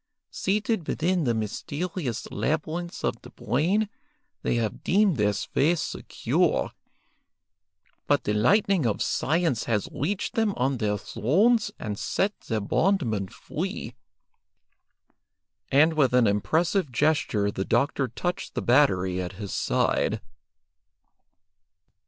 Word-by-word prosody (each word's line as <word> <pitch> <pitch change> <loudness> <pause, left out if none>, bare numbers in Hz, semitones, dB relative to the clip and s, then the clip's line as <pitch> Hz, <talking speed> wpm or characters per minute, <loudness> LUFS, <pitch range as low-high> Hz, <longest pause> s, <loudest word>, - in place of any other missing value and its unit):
Seated 210 -2 -1
within 175 0 0
the 120 -2 +1
mysterious 130 - -3
labyrinths 160 +3 -2
of - - -1
the - - -12
brain, 175 - 0 0.5
they - - 0
have 115 -3 -2
deemed 195 -4 +3
their 105 -1 +3
sway 150 - +1
secure, 165 - -1 1.4
but - - +2
the 105 - 0
lightning 185 - +3
of 105 - 0
science 160 -5 0
has 105 -3 0
reached 190 +9 -2
them 220 -3 +1
on 130 +1 +1
their 105 -2 0
thrones 205 - +2
and 105 -3 -5
set 200 +2 0
their 110 -2 -1
bondmen 115 - +1
free;" - - -5 1.8
and 155 +4 +5
with 135 -5 +2
an 125 -2 +5
impressive 155 - +1
gesture 120 -7 +1
the 95 - -3
doctor 135 +5 +1
touched 175 +10 -4
the - - -1
battery 95 -9 +3
at 90 +1 -5
his 100 0 -6
side. - - +1
140 Hz, 115 wpm, -26 LUFS, 110-175 Hz, 1.8 s, and